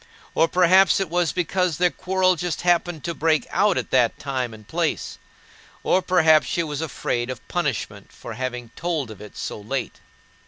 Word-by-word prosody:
Or 165 - +3
perhaps 185 +3 +5
it 190 -4 -2
was 175 -1 +1
because 180 -2 0
their 180 -1 +3
quarrel 185 0 +1
just 175 0 -3
happened 175 -3 +1
to 170 - -2
break 155 -1 +1
out 200 +2 +2
at - - -3
that 125 -3 +3
time 130 -4 -3
and 110 -2 -13
place; - - -2 0.6
or 185 - +3
perhaps 160 -4 +4
she 170 - 0
was 150 -1 -4
afraid 125 -5 -2
of 130 -3 -7
punishment 120 - -3
for 120 - -9
having 125 0 -5
told 160 -9 -2
of 110 - -11
it 105 - -12
so - - -5
late. 130 +5 -4
160 Hz, 180 wpm, -23 LUFS, 130-175 Hz, 0.6 s, perhaps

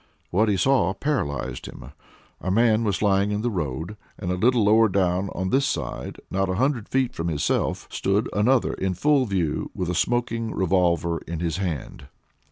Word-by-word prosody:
What 105 +4 +3
he 100 - +2
saw 105 -5 +2
paralyzed 95 - -2
him! 65 - -10 0.5
A 95 - -3
man 110 +2 +3
was 100 -2 -1
lying 100 0 +3
in 105 +1 -2
the 120 - 0
road, 80 +2 -4 0.2
and 90 -3 -3
a - - 0
little 115 +4 +3
lower 110 +2 +5
down 95 0 +1
on 95 0 -2
this 135 +1 +3
side, 65 -5 -4
not 95 0 0
a 95 - 0
hundred 125 0 0
feet 130 -2 +1
from 80 - -3
himself, 80 -3 -1
stood 100 +4 0
another 120 +5 +2
in 95 -1 -2
full 140 - +2
view, 90 -7 -1
with 90 -1 -2
a - - -2
smoking 115 +3 -1
revolver 85 -3 +1
in 85 -1 -4
his 85 -1 -1
hand. 90 -7 -4
95 Hz, 180 wpm, -24 LUFS, 90-115 Hz, 0.5 s, lower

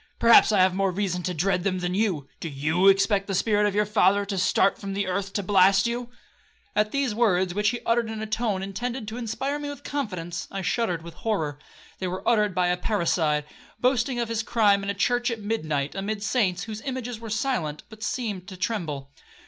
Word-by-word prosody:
perhaps 230 -1 +7
I 205 -3 +4
have 185 0 +4
more 195 +1 +1
reason 185 -1 -1
to 180 +1 -2
dread 180 +2 +1
them 185 -1 0
than 180 0 -2
you. 185 -9 0
Do 165 - -4
you 155 +7 +1
expect 195 +1 +4
the 195 - -1
spirit 210 +1 +2
of 205 - -2
your 210 0 +3
father 205 -1 +3
to 200 0 -3
start 195 +1 +2
from 195 -1 -5
the 200 0 0
earth 195 +2 -2
to 205 - -1
blast 195 +1 +4
you?' 240 +1 -2 0.7
At 210 0 +2
these 275 -5 0
words, 190 -5 +2
which 210 +2 +2
he 240 +1 -3
uttered 230 -1 +1
in 220 -1 -5
a 220 - -3
tone 215 -3 -1
intended 235 +4 -4
to 225 - -6
inspire 265 +5 -3
me 290 0 -4
with 285 -2 -8
confidence, 185 -11 -4
I 195 -1 -5
shuddered 180 -2 -1
with 170 0 -9
horror. 160 -8 -2 0.4
They 185 - -2
were 185 +1 -5
uttered 210 -5 +3
by 180 -1 +2
a 180 - +1
parricide, 165 -6 0 0.3
boasting 250 0 +1
of 235 - 0
his 225 -1 0
crime 215 -3 +3
in 200 - -4
a 200 - -1
church 245 +4 +1
at 230 -2 -3
midnight, 155 -10 -2
amid 205 +2 -3
saints, 215 -5 +1
whose 220 -1 -6
images 250 -4 -4
were 225 -1 -8
silent, 215 - -1
but 220 -1 -14
seemed 210 -6 -3
to 190 -2 -9
tremble. 160 -9 -3
200 Hz, 215 wpm, -25 LUFS, 185-225 Hz, 0.7 s, perhaps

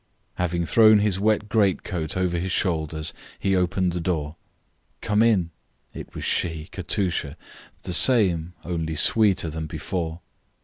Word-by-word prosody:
Having 85 -1 -1
thrown 110 +3 +6
his 105 -2 +1
wet 105 0 +1
greatcoat 95 -6 0
over 90 -2 0
his 95 +2 -3
shoulders, 80 -4 -1 0.2
he 95 0 0
opened 90 0 +1
the 85 0 -3
door. 80 -3 -2 0.6
"Come 105 0 +1
in." 100 -8 +2 0.4
It - - -10
was - - -6
she, 80 -2 -1
Katusha, 90 -5 -2 0.5
the 90 - -2
same, 90 -6 +3
only 80 -2 -3
sweeter 95 0 +2
than 80 0 -5
before. 80 +1 -4
90 Hz, 135 wpm, -24 LUFS, 80-100 Hz, 0.6 s, thrown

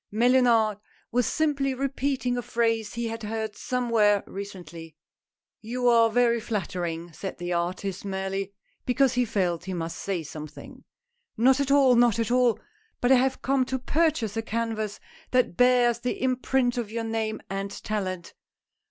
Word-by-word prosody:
Mellunard 230 -2 +3 0.3
was 245 0 +1
simply 280 -4 0
repeating 270 -1 -1
a 245 - -1
phrase 225 -2 -1
he 235 0 -2
had 225 0 -5
heard 220 0 -4
somewhere 230 -5 +2
recently. 170 -5 -9 0.7
"You 245 +3 -2
are 230 -1 +5
very 235 0 +3
flattering," 175 -6 -4
said 190 +6 -6
the 175 +1 -3
artist, 180 +2 -2
merely 195 0 -3 0.3
because, 260 +1 +2
he 250 0 +2
felt 180 -5 -1
he 190 -1 -4
must 165 -1 -4
say 190 -4 -2
something. 155 0 -10 0.2
" 475 0 -51
Not 260 +4 +4
at 280 -1 0
all! 275 -2 +5
not 235 -2 +4
at 230 0 -1
all! 250 -3 +3 0.4
But 245 - +2
I - - +8
have 265 +1 0
come 270 0 +2
to 260 +1 -2
pur 315 +6 +2
chase 230 -9 -4
a 225 - 0
canvas 225 -2 -3 0.3
that 250 -8 +2
bears 245 0 +4
the 245 +1 -3
imprint 255 -1 +1
of 230 -3 -4
your 230 +1 -3
name 225 -1 -2
and 195 +1 -3
talent." 190 -4 -4
230 Hz, 160 wpm, -26 LUFS, 195-250 Hz, 0.7 s, I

